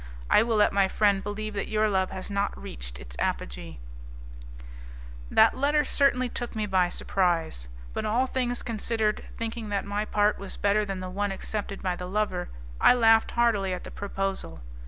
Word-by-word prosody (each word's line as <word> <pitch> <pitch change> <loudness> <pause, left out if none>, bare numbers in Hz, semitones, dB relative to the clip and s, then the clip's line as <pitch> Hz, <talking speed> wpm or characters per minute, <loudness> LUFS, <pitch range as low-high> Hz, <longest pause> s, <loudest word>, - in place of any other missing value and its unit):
I - - +7
will 230 0 +1
let 210 -1 +4
my 195 -1 +4
friend 200 0 +2
believe 210 +1 -4
that 200 - -3
your 215 0 +2
love 190 -2 +1
has 190 +2 -7
not 200 0 -1
reached - - -7
its - - -11
apogee" 70 +6 -3 1.5
That 220 - +5
letter 290 +3 +2
certainly 270 -3 +2
took 240 0 -5
me 215 -1 -1
by 185 -3 +2
surprise, 170 - -1 0.3
but - - -2
all 230 +5 +2
things 250 -2 -2
considered, 220 -1 -1
thinking 225 -1 -4
that 200 -1 -1
my 205 +1 -2
part 210 0 +2
was 195 - -6
better 205 +1 +2
than 195 -2 -4
the 185 0 -5
one 205 +1 -1
accepted 200 +1 -4
by 180 -2 0
the 180 0 -6
lover, 185 -2 -1 0.3
I - - +7
laughed 225 -2 +5
heartily 210 -6 +2
at 180 - -8
the - - -9
proposal. 195 - -4
205 Hz, 175 wpm, -27 LUFS, 190-225 Hz, 1.5 s, I